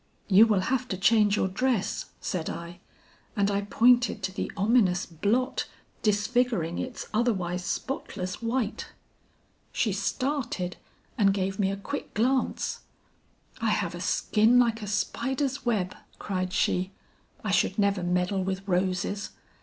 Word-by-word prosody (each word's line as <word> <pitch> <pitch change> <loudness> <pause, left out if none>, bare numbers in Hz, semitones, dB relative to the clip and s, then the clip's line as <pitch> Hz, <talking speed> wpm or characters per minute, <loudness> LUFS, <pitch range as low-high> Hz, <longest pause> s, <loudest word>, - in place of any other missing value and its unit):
"'You 215 +3 +7
will 210 -4 +2
have 255 +4 0
to 190 - -3
change 210 +1 +4
your 190 - +1
dress,' 225 +2 -1
said 165 -3 -3
I, 170 +1 -7 0.6
and 200 -1 +2
I 200 0 +1
pointed 235 +1 +3
to 190 0 -2
the - - -3
ominous 200 -4 +3
blot 210 - 0 0.3
disfiguring 210 -4 +1
its 255 -1 -5
otherwise 190 -6 0
spotless 185 -6 -4
white. 230 -1 -2 0.8
"She - - 0
started 255 -10 -2 0.4
and 195 -2 +4
gave 195 0 -2
me 195 -1 +2
a 195 - -2
quick 285 +8 -6
glance. 255 +4 0 0.8
"'I - - +2
have - - 0
a - - -6
skin 220 +3 +3
like 235 -2 +3
a 210 - -5
spider's 265 +6 -1
web," 195 -6 +1 0.2
cried 185 -2 -3
she. 185 0 0 0.5
'I - - -1
should - - +2
never 200 -2 +2
meddle 180 +2 0
with 190 +1 -3
roses.' 185 +2 0
205 Hz, 140 wpm, -27 LUFS, 185-240 Hz, 0.8 s, You